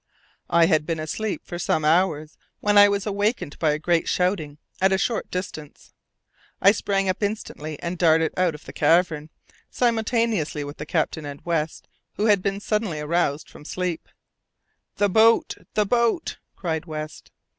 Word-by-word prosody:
I 170 0 +5
had 155 -3 +2
been 165 -2 -1
asleep 200 +7 -3
for 175 - -6
some 155 -2 0
hours 155 -2 +2 0.2
when 210 0 +1
I 205 0 +8
was 200 0 -1
awakened 205 - -1
by 160 - +2
a 150 - +1
great 170 +2 +1
shouting 180 -6 0 0.2
at 190 +1 +4
a 190 - +3
short 230 +4 -1
distance. 155 -5 -7 0.7
I 195 - +7
sprang 195 -2 -1
up 185 +2 -1
instantly 155 -8 -4
and 175 0 -3
darted 160 -2 +3
out 180 -4 +1
of 150 - -13
the - - -9
cavern, 165 -3 +2 0.4
simultaneously 225 - 0
with 145 +1 -8
the - - -7
captain 160 -1 -1
and 140 0 -7
West, 165 -2 -2 0.3
who 210 - 0
had 205 -3 +5
also 190 - 0
been 195 0 -5
suddenly 210 -6 -1
aroused 150 -1 0
from - - -14
sleep. 180 +1 -3 0.9
"The 205 - +2
boat! 225 +4 +4 0.2
the 210 - +3
boat!" 235 - 0 0.2
cried 160 -3 -3
West. 155 -1 -7
175 Hz, 165 wpm, -24 LUFS, 155-205 Hz, 0.9 s, I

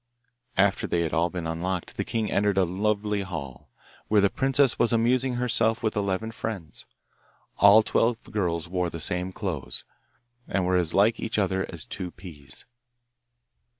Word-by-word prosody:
After 100 +1 +2
they 85 - 0
had 80 -2 -2
all 85 +3 +2
been 90 -2 -5
unlocked 85 +2 -3
the - - -1
king 110 -2 -2
entered 100 -1 +1
a 95 - +4
lovely 105 +3 -1
hall, 75 -7 -7 0.4
where 105 - +4
the 100 -1 +3
princess 135 -1 +2
was 120 - +3
amusing 125 +2 +2
herself 115 -2 +2
with 110 - 0
eleven 100 +2 -1
friends. 105 -7 -6 0.7
All 100 +2 +7
twelve 115 +1 +1
girls 90 -5 -1
wore 90 0 -1
the 80 - -7
same 90 +3 -1
clothes, 80 - -4 0.6
and 95 -2 0
were 90 0 +1
as 85 -3 +1
like 105 +4 +4
each 115 - -3
other 95 -2 0
as 85 -4 -8
two 90 -2 -5
peas. 80 -7 -12
95 Hz, 160 wpm, -26 LUFS, 85-110 Hz, 0.7 s, All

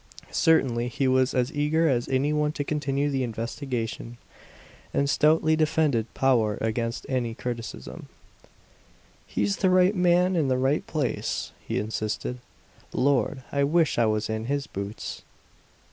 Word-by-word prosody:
Certainly 125 -7 +2
he 130 +2 -1
was 130 +1 +2
as 125 +4 +1
eager 155 +3 +2
as 120 -5 0
any 135 +3 +1
one 150 0 +1
to 145 - -2
continue 145 -1 -1
the 135 -1 0
investigation, 115 0 -4 0.8
and 140 - +2
stoutly 155 +2 +3
defended 155 -7 +1
Powart 115 -6 +2
against 115 +1 -2
any 120 -4 -1
criticism. 120 -2 -6 1.2
"He's 100 -1 0
the 190 - +2
right 185 +2 +4
man 180 0 +3
in 155 -5 +2
the 130 -1 +2
right 135 +3 +1
place!" 150 -5 -2 0.2
he - - -1
insisted. 110 +3 -3 0.5
"Lord, 130 -1 +1
I 140 0 +1
wish 160 -1 +2
I 115 - +4
was 110 0 0
in 110 0 -3
his 140 +2 -1
boots!" 100 +2 -6
130 Hz, 140 wpm, -26 LUFS, 115-150 Hz, 1.2 s, right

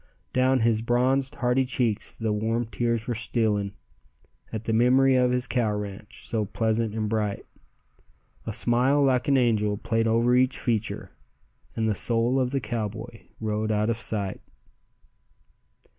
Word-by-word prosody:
Down 130 0 +3
his 110 -1 +2
bronzed 130 +4 +1
hardy 125 0 +1
cheeks 125 -4 -1
the 110 -2 -2
warm 115 +3 -1
tears 115 0 -1
were 120 - 0
stealing, 110 -3 0 0.8
At 110 0 -4
the 110 - -1
memory 130 +4 +4
of 125 -1 +3
his 125 0 0
cow 120 -4 0
ranch, 105 0 -7
so 110 -2 -1
pleasant 110 +1 -1
and 110 -1 -1
bright. 105 -2 -2 1.0
A - - -1
smile 125 +6 +2
like 130 0 +2
an 140 -1 +4
angel 105 -4 +2
played 115 +1 0
over 115 +2 +3
each 130 +1 +2
feature, 115 -3 -2 0.6
And 110 -1 0
the 110 - +2
soul 120 +5 +1
of 125 -1 +1
the 135 +1 -1
cowboy 115 -1 -5
rode 110 0 -1
out 105 +1 +1
of 115 - -2
sight. 105 -5 -2
115 Hz, 150 wpm, -26 LUFS, 110-125 Hz, 1.0 s, memory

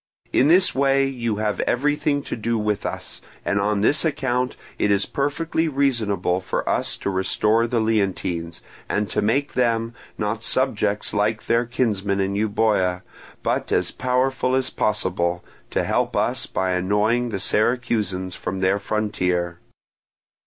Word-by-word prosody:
In 135 - +4
this 185 +4 +5
way 135 0 +3
you 120 -5 -2
have 105 0 -1
everything 145 +2 +1
to - - -4
do 115 +1 -1
with 105 -1 -1
us, - - -6 0.2
and 100 0 +1
on 105 0 +1
this 145 +8 +3
account 130 -5 0 0.2
it 105 - +2
is 100 0 +2
perfectly 160 +3 -1
reasonable 115 - 0
for 95 - -3
us - - 0
to 100 - -2
restore 105 +4 +2
the 120 0 0
Leontines, 95 -6 -1 0.3
and 105 -1 -1
to - - +1
make 140 +7 +1
them, 115 -2 +1 0.2
not 105 +1 -2
subjects 105 -5 0
like 105 +1 0
their 115 +1 +2
kinsmen 105 -5 0
in 95 0 0
Euboea, 100 -3 +1 0.4
but - - -1
as - - +2
powerful 130 0 0
as 130 -1 0
possible, 90 -4 -1 0.2
to - - 0
help - - 0
us - - 0
by 95 0 -1
annoying 105 +6 +1
the 100 - -3
Syracusans 105 -4 0
from 95 +1 -4
their 95 +2 +2
frontier. 90 -5 -1
110 Hz, 145 wpm, -23 LUFS, 100-125 Hz, 0.4 s, this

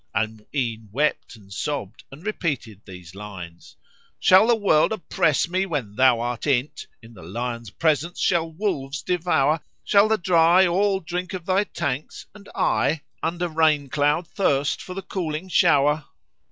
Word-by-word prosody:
Al 110 +2 +1
Mu'ín 110 0 -5
wept 145 +1 -1
and 100 -3 -14
sobbed 115 -4 -4
and 150 +7 -13
repeated 140 - -3
these 90 -3 -11
lines, 95 -4 -10 0.4
"Shall 190 +4 +6
the 240 - +5
World 195 -7 +3
oppress 170 -7 +1
me 185 +2 -1
when 135 - -3
thou 130 -1 +4
art 120 +2 -3
in't? 135 0 -1
* - - -43
In 115 +1 -14
the 100 - -13
lion's 115 +6 -5
presence 160 - 0
shall 165 -2 +1
wolves 150 -6 -3
devour? 165 -4 +1 0.2
Shall 205 +1 +4
the 220 0 +2
dry 175 0 +4
all 190 +2 +1
drink 180 +3 -4
of 180 -2 -7
thy 190 +2 +2
tanks 145 -6 -4
and 205 -1 -15
I 155 -1 +1
* - - -44
Under 175 +1 -1
rain 155 -3 +2
cloud 150 +5 +1
thirst 145 -8 0
for 185 - -8
the 195 - -5
cooling 175 -2 -4
shower?" 150 -2 +3
150 Hz, 165 wpm, -23 LUFS, 120-180 Hz, 0.4 s, Shall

